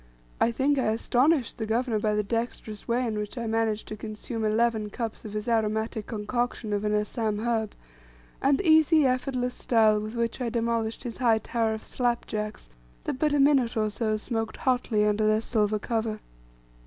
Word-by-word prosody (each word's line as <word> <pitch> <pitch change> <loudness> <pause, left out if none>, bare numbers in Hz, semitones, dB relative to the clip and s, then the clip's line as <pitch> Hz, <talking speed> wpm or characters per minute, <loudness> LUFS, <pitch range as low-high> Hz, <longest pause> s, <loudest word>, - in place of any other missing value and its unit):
I - - +4
think 270 +4 +1
I - - +1
astonished 250 +5 +2
the 220 - -2
governor 230 0 0
by 210 0 +1
the 210 - +1
dexterous 225 -1 -4
way 245 +2 +1
in 215 -3 -2
which 210 +4 -5
I 235 - -3
managed 220 -1 0
to 215 - -4
consume 215 +1 -5
eleven 220 0 +1
cups 225 +1 -5
of 210 - -7
his 210 +1 -4
aromatic 220 -1 0
concoction 225 0 -2
of 205 0 -1
an 210 0 +1
Assam 210 0 -1
herb, 220 -1 -1 0.7
and 275 0 +4
the 375 - -2
easy 315 -1 +6
effortless 255 -1 0
style 220 -4 +3
with 215 +2 -6
which 235 +2 -2
I 240 - 0
demolished 230 -1 -1
his 235 -2 -5
high 235 -3 +3
tower 225 0 -1
of 220 - -9
"slap 240 -2 -1
jacks," 210 - -4 0.4
that 255 - -3
but 300 0 +2
a 290 - +2
minute 270 -4 +3
or 215 -1 +1
so 215 0 -1
smoked 225 0 -3
hotly 245 -5 +1
under 210 +1 +2
their 215 0 +3
silver 215 -2 0
cover. 220 -1 -2
225 Hz, 190 wpm, -27 LUFS, 215-245 Hz, 0.7 s, easy